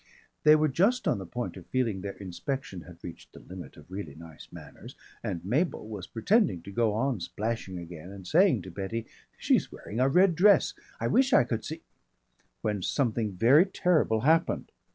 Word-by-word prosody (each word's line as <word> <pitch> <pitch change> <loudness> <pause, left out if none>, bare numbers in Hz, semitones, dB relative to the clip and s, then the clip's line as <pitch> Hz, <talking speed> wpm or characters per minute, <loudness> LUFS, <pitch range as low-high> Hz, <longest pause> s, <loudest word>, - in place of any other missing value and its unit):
They 150 0 +7
were 155 0 +3
just 200 - +1
on - - +1
the 95 - -7
point 115 -3 -4
of 90 - -12
feeling 115 -7 -1
their 100 0 -5
inspection 100 +2 -5
had 85 0 -15
reached 85 - -10
the - - -12
limit 95 -1 -11
of 75 +4 -16
really 95 -7 -6
nice 80 -1 -12
manners - - -12 0.3
and 85 - -4
Mabel 135 - 0
was 105 -5 -7
pretending 115 - +1
to 100 - -9
go 110 0 +1
on 130 -1 0
splashing 105 0 -4
again 85 0 -9
and 100 -2 -10
saying 160 - +3
to 95 - -9
Betty, 100 +5 -4 0.3
"She's - - +1
wearing 110 - -7
a 130 +1 +4
red 180 +5 +4
dress. 195 +5 +4 0.3
I - - -2
wish 265 +1 +3
I - - +7
could 115 -2 -3
see 160 +2 -7 0.4
" - - -42
when 105 -2 -1
something 115 -2 0
very 135 - +5
terrible 165 - +1
happened. 160 +5 +2
110 Hz, 190 wpm, -28 LUFS, 95-150 Hz, 0.4 s, They